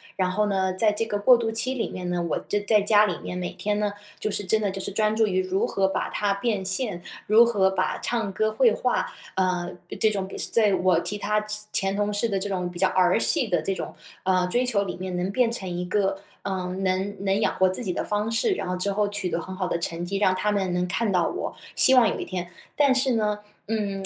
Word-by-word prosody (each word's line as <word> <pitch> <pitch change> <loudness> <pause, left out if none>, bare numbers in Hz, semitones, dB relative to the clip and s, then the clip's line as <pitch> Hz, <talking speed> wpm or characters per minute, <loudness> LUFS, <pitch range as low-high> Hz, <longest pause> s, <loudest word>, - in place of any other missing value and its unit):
然 185 -1 +1
后 210 +3 +1
呢， 190 -2 0
在 210 +3 +3
这 210 +2 -1
个 205 -2 -2
过 245 +5 +7
渡 230 -1 -1
期 230 +4 0
里 235 - -2
面 180 -1 -6
呢， 175 -1 -1
我 - - 0
这 205 - +1
在 205 +1 +3
家 210 +1 +5
里 180 - -2
面 180 - -5
每 180 -1 -3
天 210 0 -1
呢， 205 -1 0 0.3
就 - - -1
是 205 - -2
真 215 +3 +2
的 205 - +1
就 195 - -6
是 200 - -5
专 215 +1 +1
注 220 0 +3
于 185 -2 +1
如 185 +1 0
何 195 -1 +1
把 190 - -2
它 205 -1 0
变 205 -2 -1
现， 190 -1 -2 0.3
如 220 +3 +7
何 200 -5 +3
把 - - -1
唱 225 -4 -2
歌、 215 +2 +1
绘 230 +2 +4
画， 250 - 0 0.3
呃， 180 -2 0 0.3
这 220 - +4
种 195 -2 -2
比 - - -8
是 - - -3
在 215 -3 +3
我 180 -2 +3
其 205 - -3
他 210 +1 0
前 210 -1 -3
前 195 - 0
同 205 0 0
事 205 +3 0
的 200 -3 -1
这 200 +2 -3
种 180 -2 -2
比 175 - -10
较 190 +1 +3
儿 185 +2 +3
戏 240 +2 +1
的 175 -5 +1
这 195 +5 -1
种， - - -6 0.3
呃， 185 -1 +2
追 245 +6 +1
求 210 -5 +1
里 195 - -5
面， 185 0 -4
能 180 +2 -1
变 245 +2 +2
成 200 -5 -5
一 180 0 -3
个， 195 0 0 0.2
呃， 190 -2 -3
能 190 +1 -1
能 195 0 +1
养 - - +1
活 185 0 +3
自 185 - -2
己 190 -7 -2
的 - - -2
方 210 +1 -1
式， 230 - +1
然 - - -4
后 180 - -1
之 185 +3 -1
后 205 +1 +1
取 200 -3 -2
得 170 - -1
很 185 +3 -7
好 185 -1 -2
的 170 - -1
成 170 0 -3
绩， 195 +3 -2
让 190 -2 +3
他 210 +3 0
们 190 -3 0
能 180 0 0
看 225 +3 0
到 180 -3 +2
我， - - -4 0.2
希 265 - +6
望 245 -5 +6
有 - - -3
一 - - -4
天。 180 -1 -5 0.3
但 280 -3 +4
是 260 0 +2
呢， 210 -2 0 0.3
嗯， 200 -3 -1
200 Hz, 280 characters per minute, -25 LUFS, 185-215 Hz, 0.3 s, 过